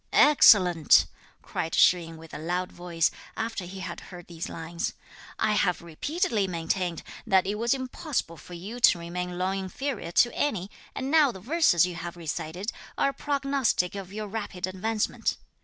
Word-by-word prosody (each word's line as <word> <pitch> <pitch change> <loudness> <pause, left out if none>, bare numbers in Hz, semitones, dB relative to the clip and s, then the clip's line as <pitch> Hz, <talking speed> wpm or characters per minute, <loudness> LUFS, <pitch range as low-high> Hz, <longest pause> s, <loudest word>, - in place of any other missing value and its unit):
"Excellent!" 185 - +6 0.4
cried 165 - -3
Shih 175 -2 +5
yin 165 0 -10
with 160 0 -13
a - - -5
loud 180 +3 -2
voice, 175 -2 0 0.3
after 225 -4 -3
he 190 +2 -8
had 170 -2 -5
heard 175 -2 -10
these 170 -1 -6
lines; 165 +1 -4 0.4
"I 215 - +1
have 180 -4 +1
repeatedly 215 - -1
maintained 175 0 -2 0.2
that 190 -3 +4
it 200 - -1
was 230 +4 +1
impossible 260 - -3
for 175 - -11
you 205 +8 -7
to 235 - +6
remain 175 +1 -5
long 190 +2 0
inferior 205 +1 -4
to 240 - +4
any, 205 -9 -1 0.2
and 265 +1 -3
now 305 -4 +5
the 190 - -10
verses 235 - +3
you 180 - -4
have 170 0 -7
recited 170 +4 -4 0.3
are - - +3
a - - -5
prognostic 275 -11 0
of 195 -2 -7
your 215 +1 -5
rapid 205 -3 -4
advancement. 210 +4 -1
185 Hz, 170 wpm, -27 LUFS, 175-225 Hz, 0.4 s, Excellent